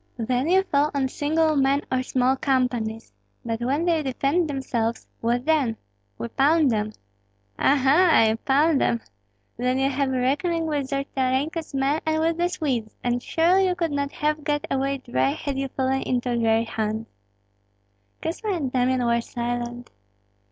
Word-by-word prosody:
"Then 250 +5 0
you 380 +2 +4
fall 295 -5 +1
on 270 -2 +1
single 310 +3 +1
men 275 +1 +2
or 260 0 +1
small 255 0 +1
companies; 245 - -1 0.3
but 225 0 -3
when 280 +7 0
they 335 -3 +2
defend 285 +4 0
themselves, 235 -5 -2
what 240 +2 0
then?" 285 -8 +1 0.4
"We 115 - -4
pound 295 0 +3
them." 215 -1 -1 0.7
"Ah, 280 - +4
ha, 290 +2 +5
you 220 +1 +1
pound 285 +4 +2
them! 235 - +1 0.6
Then 250 +2 0
you 270 +1 +1
have 275 0 0
a 260 -1 -1
reckoning 325 +6 0
with 290 -4 -1
Zolotarenko's 275 +3 -2
men 275 +3 +1
and 315 0 0
with 325 +1 +1
the 350 +1 +1
Swedes, 260 -11 -2
and 245 0 0
surely 360 +7 +3
you 360 - 0
could 335 -3 -1
not 280 0 -1
have 300 0 -1
got 295 -1 -1
away 275 +1 0
dry 260 +2 0
had 285 -3 -4
you 275 - -1
fallen 265 0 -1
into 245 -1 -1
their 225 -1 +2
hands." 220 -1 -3 1.2
Kosma 390 +6 -2
and 275 -6 -3
Damian 255 0 +1
were 235 0 +2
silent. 240 0 -4
270 Hz, 165 wpm, -24 LUFS, 245-305 Hz, 1.2 s, ha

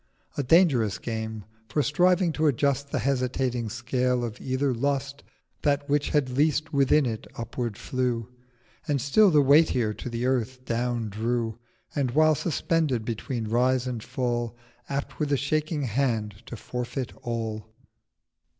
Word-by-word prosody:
A - - 0
dangerous 135 - +4
Game; 110 -2 -5 0.2
for, 150 - +1
striving 175 +4 +3
to 155 0 +2
adjust 140 +1 +1
The 140 - -1
hesitating 125 -2 0
Scale 125 +1 0
of 115 0 -5
either 130 +1 0
Lust, 140 +2 -2 0.4
That 145 -1 +1
which 145 0 +1
had 140 -4 +1
least 155 +3 +1
within 140 +1 +4
it 110 -2 -4
upward 115 -2 -4
flew, 125 -3 -1 0.6
And 145 -3 +1
still 170 - +5
the 150 -4 +5
weightier 135 -6 +4
to 125 - -7
the 120 +1 -2
Earth 130 0 -1
down 120 -1 -1
drew, 115 +2 -2 0.3
730 145 - -2
And, 130 -3 0
while 155 0 +6
suspended 155 -5 0
between 115 0 -3
Rise 125 +3 +2
and 125 -3 -3
Fall, 120 -1 -2 0.3
Apt 140 0 -4
with 150 -2 -1
a 140 - +3
shaking 155 +2 -1
Hand 115 -5 -1
to - - -6
forfeit 125 +2 -4
all. 110 -3 -3
130 Hz, 150 wpm, -26 LUFS, 115-145 Hz, 0.6 s, while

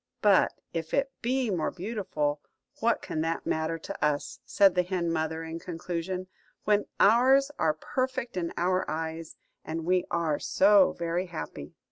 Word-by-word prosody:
"But 205 -3 +5 0.2
if 165 -1 -2
it 275 0 +1
be 250 -1 0
more 175 -4 0
beautiful, 180 -8 -2 0.4
what 230 0 +1
can 155 - -3
that 165 +1 -2
matter 160 +1 -1
to 160 - -7
us," 150 -1 -1
said 195 -2 +5
the 180 - +3
hen 180 -2 -1
mother, 160 0 -2
in 165 +1 -6
conclusion, 175 +2 -4 0.4
"when 210 -1 +2
ours 265 +6 +5
are 155 -1 +2
perfect 255 +6 -3
in 170 -2 -2
our 185 +2 +1
eyes, 160 +1 -4 0.3
and 160 0 -4
we 180 0 +2
are 165 -4 0
so 200 0 +5
very 170 +2 -2
happy?" 155 - -7
175 Hz, 155 wpm, -28 LUFS, 160-205 Hz, 0.4 s, But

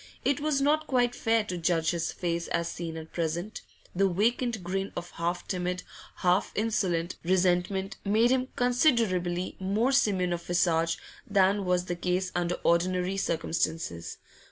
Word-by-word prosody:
It 280 0 +2
was 295 -2 +1
not 305 +2 +2
quite 245 -2 +2
fair 225 -2 +1
to 180 -4 -4
judge 165 -1 +1
his 170 -2 -2
face 170 -1 -2
as 170 - -1
seen 165 -1 -5
at 160 0 -9
present; 170 +4 -3 0.3
the 195 +1 +3
vacant 225 +3 0
grin 195 +2 -2
of 175 0 -6
half 170 +1 -3
timid, 180 -1 -2 0.3
half 180 +1 +2
insolent, 185 -6 0
resentment 185 +2 +1
made 220 +4 +3
him 260 0 +2
considerably 225 - +1
more 205 +7 +1
simian 195 -10 +2
of 170 - -3
visage 170 -1 +1 0.3
than 200 0 +3
was 180 0 +1
the 175 - -2
case 180 +2 -1
under 175 0 0
ordinary 180 +2 +2
circumstances. 160 - -2
180 Hz, 150 wpm, -28 LUFS, 175-215 Hz, 0.3 s, the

